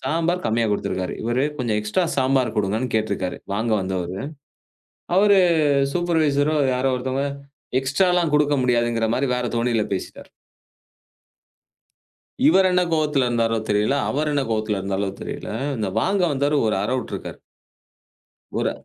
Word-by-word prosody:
சாம்பார் 165 +6 -1
கம்மியா 115 +1 +1
குடுத்துருக்காரு. 95 -2 -2
இவரு 120 +4 +1
கொஞ்சம் 115 -4 0
எக்ஸ்ட்ரா 105 - 0
சாம்பார் 130 -2 +1
கொடுங்கன்னு 110 +5 -1
கேட்டுருக்காரு, 100 -4 -2 0.2
வாங்க 110 +2 -1
வந்தவரு. 95 0 -3 1.0
அவரு 200 -1 +5 0.5
சூப்பர்வைசரோ 155 -4 +1 0.2
யாரோ 130 +1 +1
ஒருத்தங்க 130 +2 -2 0.6
எக்ஸ்ட்ரா 145 +8 +1
எல்லாம் 170 -4 +1
கொடுக்க 150 -1 +3
முடியாதுங்கிற 120 -2 +1
மாரி 135 0 0
வேற 125 - -2
தொனில 115 -2 +1
பேசிட்டார். 95 - -7 2.2
இவரு 190 -10 +5
என்ன 180 0 +3
கோவத்துல 150 -4 +1
இருந்தாரோ, 115 -1 +1
தெரியல. 105 +7 +2
அவரு 150 +2 -1
என்ன 140 -1 +1
கோவத்துல 110 -2 -1
இருந்தாரோ? 95 +1 -2
தெரியல. - - -6 0.3
இந்த 105 - -1
வாங்க 195 -1 +1
வந்தவரு 145 +2 +1
ஒரு - - +1
அறை 125 +5 -1
உட்டுருக்காரு. - - -7 1.2
ஒரு - - +1
125 Hz, 125 wpm, -22 LUFS, 110-150 Hz, 2.2 s, அவரு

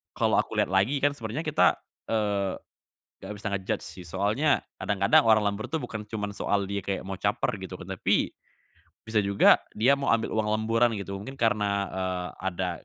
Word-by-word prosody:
kalau - - +2
aku - - -1
lihat - - 0
lagi 100 +9 +2
kan 145 - +4
sebenarnya 115 +5 -4
kita, 155 +1 +4 0.4
eee, 100 -3 0 0.7
nggak 95 - -5
bisa 105 - -8
nge-judge 95 -1 -2
sih 90 - -10
soalnya 105 - +1 0.2
kadang-kadang 100 +1 +3
orang 110 -1 +5
lembur 105 +3 -5
tuh 160 - 0
bukan 110 -3 -5
cuman 105 -1 -4
soal 100 0 0
dia 100 0 -2
kayak 100 -1 -2
mau 95 - -3
caper 105 +2 0
gitu 95 0 -7
kan, 90 - -9
tapi, - - +2 0.7
bisa 110 -1 +1
juga 100 0 +5 0.2
dia 120 +6 +4
mau 140 0 -3
ambil 115 -1 +1
uang 110 -1 0
lemburan 115 +2 +2
gitu. 100 0 -5
Mungkin 135 +7 -8
karena, 110 -4 +2 0.2
eee, 90 -1 -2 0.2
ada, 85 - -2
105 Hz, 180 wpm, -27 LUFS, 100-115 Hz, 0.7 s, orang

